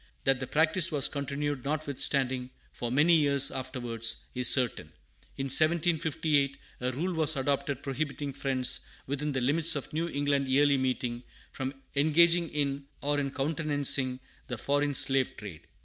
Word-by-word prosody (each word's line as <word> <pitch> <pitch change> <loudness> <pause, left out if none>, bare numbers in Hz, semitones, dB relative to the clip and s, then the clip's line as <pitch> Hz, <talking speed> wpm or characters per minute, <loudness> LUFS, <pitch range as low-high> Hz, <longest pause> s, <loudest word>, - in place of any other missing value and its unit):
That 135 -1 +2
the 130 - -5
practice 160 +4 +2
was 145 -3 +2
continued 140 -1 -4
notwithstanding, 135 -3 -1 0.2
for 120 -1 -5
many 150 +6 +4
years 140 -2 +3
afterwards, 120 -3 -3
is 125 -1 +5
certain. 125 -4 +3 0.5
In 135 - -3
1758, 155 -1 +2 0.2
a 125 0 -2
rule 175 +8 -2
was 160 -1 +1
adopted 140 0 -2
prohibiting 140 0 -4
Friends 130 -2 0 0.3
within 145 +2 -3
the 130 -2 -2
limits 160 +6 +2
of 145 - -6
New 165 +2 -1
England 140 -2 -1
Yearly 140 +1 +3
Meeting 125 -2 -2 0.3
from 135 +1 -5 0.2
engaging 165 +3 +3
in 140 -1 -2 0.2
or 145 0 0
countenancing 140 -3 +1 0.3
the 125 - -5
foreign 145 +3 0
slave 135 0 +3
trade. 100 -7 -10
140 Hz, 140 wpm, -29 LUFS, 130-150 Hz, 0.5 s, is